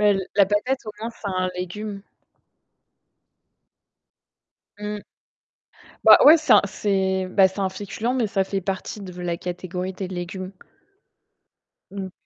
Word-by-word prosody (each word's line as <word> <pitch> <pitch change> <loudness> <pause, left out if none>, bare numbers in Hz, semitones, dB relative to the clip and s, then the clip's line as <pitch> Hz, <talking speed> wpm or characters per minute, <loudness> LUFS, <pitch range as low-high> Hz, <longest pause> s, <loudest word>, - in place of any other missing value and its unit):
Mais 210 0 +5
l 195 - -1
la 200 -2 +5
patate, 225 +7 0
au 215 - -5
moins, 225 +2 -4
c'est 225 -3 -7
un 185 -1 -1
légume. 195 +3 -5 2.8
Mmh. 210 0 -5 1.0
Bah - - +10
ouais, 310 +3 +10
c'est 310 - +3
un - - +7
c'est 190 -1 0
bah 190 +1 +5
c'est 190 +2 -9
un 190 -1 +1
féculent, 205 +5 -3
mais 245 -3 +1
ça 195 -1 0
fait 195 +1 -2
partie 195 +2 -4
de 180 -2 -8
la 175 -1 -2
catégorie 180 +1 -5
des 185 0 -5
légumes. 185 +1 -6 1.4
Mmh 195 0 -5
mh. 190 - -9
195 Hz, 145 wpm, -23 LUFS, 185-210 Hz, 2.8 s, Bah